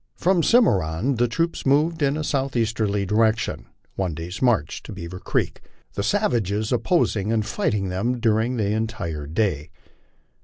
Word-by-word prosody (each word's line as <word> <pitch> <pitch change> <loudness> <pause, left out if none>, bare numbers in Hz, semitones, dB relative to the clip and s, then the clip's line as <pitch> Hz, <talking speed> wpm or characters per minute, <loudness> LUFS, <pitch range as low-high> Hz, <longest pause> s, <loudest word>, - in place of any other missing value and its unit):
From 185 +1 +2
the - - 0
Cimarron 110 - +3
the 120 +1 +3
troops 165 +8 -1
moved 155 +4 +2
in 140 +1 +2
a 155 - -2
southeasterly 115 -8 0
direction, 110 +3 +1 0.3
one 90 -5 -2
day's 85 +3 -6
march 115 - +1
to - - -10
Bearer 90 -1 -7
creek, - - -2 0.3
the - - -2
savages 110 - 0
opposing 115 - +1
and 110 -2 +1
fighting 100 -3 -1
them 115 +7 -1
during 115 +2 +1
the 105 -2 0
entire 105 -9 -3
day. 80 -3 -1
110 Hz, 150 wpm, -23 LUFS, 95-125 Hz, 0.3 s, Cimarron